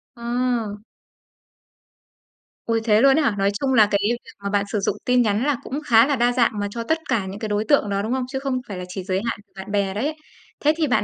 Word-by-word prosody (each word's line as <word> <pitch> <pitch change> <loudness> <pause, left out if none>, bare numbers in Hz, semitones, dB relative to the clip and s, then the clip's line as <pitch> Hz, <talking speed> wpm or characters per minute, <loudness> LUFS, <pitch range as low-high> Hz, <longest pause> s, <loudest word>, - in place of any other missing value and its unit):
Ờ. 240 -2 -1 1.9
Ôi, 230 -1 0
thế 215 -1 +4
luôn 270 +1 +6
ấy 315 - +3
hả? 230 -8 +1
Nói 195 0 +2
chung 270 -1 0
là 220 -4 +6
cái 200 - +3
việc 240 - -1 0.3
mà 200 - -2
bạn 200 0 +1
sử 215 - 0
dụng 195 0 0
tin 250 0 +4
nhắn 215 0 +1
là 290 -3 +1
cũng 275 - -4
khá 230 -2 +6
là 290 - +1
đa 240 -1 +2
dạng 245 -2 +2
mà 205 - -1
cho 230 +2 -4
tất 320 +7 +1
cả 205 -4 +1
những 190 +2 -7
cái 220 - -4
đối 210 +1 0
tượng 285 -8 +3
đó, 200 0 0
đúng 220 +3 -3
không? 260 -1 -1
Chứ 265 +1 -4
không 265 -2 -2
phải 200 - -6
là 180 - -5
chỉ 180 +1 -6
giới 190 0 -1
hạn 230 - -2
của 190 - -41
bạn 190 +1 -8
bè 200 -2 0
đấy. 280 +10 -2 0.4
Thế 300 +1 +3
thì 320 -2 +1
bạn 245 - +2
230 Hz, 260 wpm, -22 LUFS, 200-255 Hz, 1.9 s, luôn